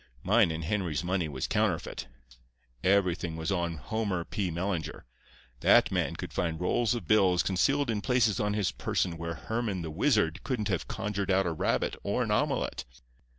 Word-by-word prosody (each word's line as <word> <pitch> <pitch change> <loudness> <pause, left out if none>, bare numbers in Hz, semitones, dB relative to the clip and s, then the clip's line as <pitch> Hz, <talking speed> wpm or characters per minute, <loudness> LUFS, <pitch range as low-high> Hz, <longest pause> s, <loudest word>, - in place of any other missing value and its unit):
"Mine 105 -1 +4
and 80 0 -3
Henry's 85 -4 -1
money 90 -2 -1
was 65 -3 -3
counterfeit. - - -1 0.8
Everything 90 -4 +2
was 80 +2 -3
on 85 -3 -1
Homer 95 - -2
P. 95 +2 -2
Mellinger. 85 -1 -3 0.6
That - - +5
man - - 0
could - - -7
find 80 -2 -1
rolls 110 +6 +1
of 120 - -6
bills 95 -4 +4
concealed 135 +8 +1
in 105 -2 -2
places 120 -4 +2
on 105 0 0
his 105 -3 +1
person 90 -3 -1
where 85 0 -4
Hermann 110 -1 -3
the 80 - -5
Wizard 85 - +1
couldn't 110 -5 -2
have 95 -4 -1
conjured 100 -1 -3
out 95 0 +3
a 85 - 0
rabbit 80 - 0
or - - 0
an - - -2
omelette. - - 0
95 Hz, 170 wpm, -29 LUFS, 85-105 Hz, 0.8 s, That